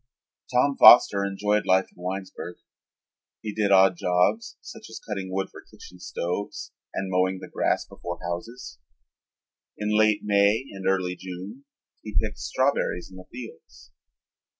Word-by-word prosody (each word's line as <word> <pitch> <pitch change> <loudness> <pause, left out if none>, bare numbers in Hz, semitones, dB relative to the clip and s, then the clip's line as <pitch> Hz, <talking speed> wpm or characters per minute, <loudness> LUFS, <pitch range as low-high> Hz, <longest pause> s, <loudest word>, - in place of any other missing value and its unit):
Tom 135 +3 +2
Foster 100 -4 +8
enjoyed 105 +2 0
life 95 +1 +3
in - - -16
Winesburg. 95 -1 -5 0.9
He 105 -2 -4
did 105 -1 0
odd 95 -1 +5
jobs, 90 +6 0
such - - -11
as - - -8
cutting 95 -2 -5
wood 95 +1 -2
for - - -12
kitchen 90 - -15
stoves 90 +3 -4 0.2
and 95 -1 -4
mowing 95 +1 +1
the - - -9
grass - - 0
before 85 0 -7
houses. 85 - -7 1.0
In 105 0 -1
late 110 -1 +3
May 105 +3 +3
and 95 -1 -6
early 90 -1 0
June 95 +9 -9 0.4
he 105 -1 -5
picked 105 -1 -4
strawberries 130 -9 -1
in 95 - -12
the 90 - -11
fields. 120 - -12
95 Hz, 145 wpm, -25 LUFS, 90-105 Hz, 1.0 s, Foster